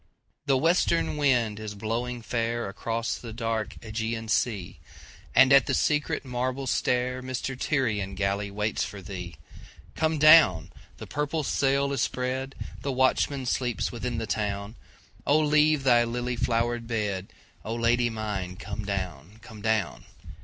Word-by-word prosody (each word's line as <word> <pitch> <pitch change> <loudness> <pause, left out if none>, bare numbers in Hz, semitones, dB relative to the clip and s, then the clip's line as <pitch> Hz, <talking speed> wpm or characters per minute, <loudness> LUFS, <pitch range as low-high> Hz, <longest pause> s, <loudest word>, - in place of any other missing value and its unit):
THE 135 -1 +4
WESTERN 165 +2 +2
wind 120 -8 +2
is 105 -1 -6
blowing 115 +3 -3
fairAcross 115 -1 -2
the 115 -2 -7
dark 115 -2 -2
Ægean 110 0 -3
sea, 105 -8 -1 0.6
And 135 +1 +7
at 140 - +6
the - - +1
secret 150 -2 0
marble 130 +2 -2
stairMy 125 +1 0 0.2
Tyrian 105 -9 0
galley 100 +1 -1
waits 105 +2 -1
for 100 0 -6
thee. 90 -2 -7 0.6
Come 160 0 0
down! 150 - +6 0.3
the - - -8
purple 150 +2 -2
sail 140 0 +1
is 135 - -1
spread, 130 +2 -2 0.3
The 140 - -2
watchman 130 +1 +1
sleeps 125 -1 -1
within 120 0 -3
the 115 - -2
town,O 105 +7 -3
leave 150 -1 +3
thy 120 -3 +5
lily 120 +1 -2
flowered 120 0 0
bed,O 105 0 -4
Lady 120 +1 +2
mine 105 -5 -4
come 105 +2 -6
down, 95 -2 -5
come 110 -1 -11
down! 110 - -1
115 Hz, 130 wpm, -27 LUFS, 105-130 Hz, 0.6 s, And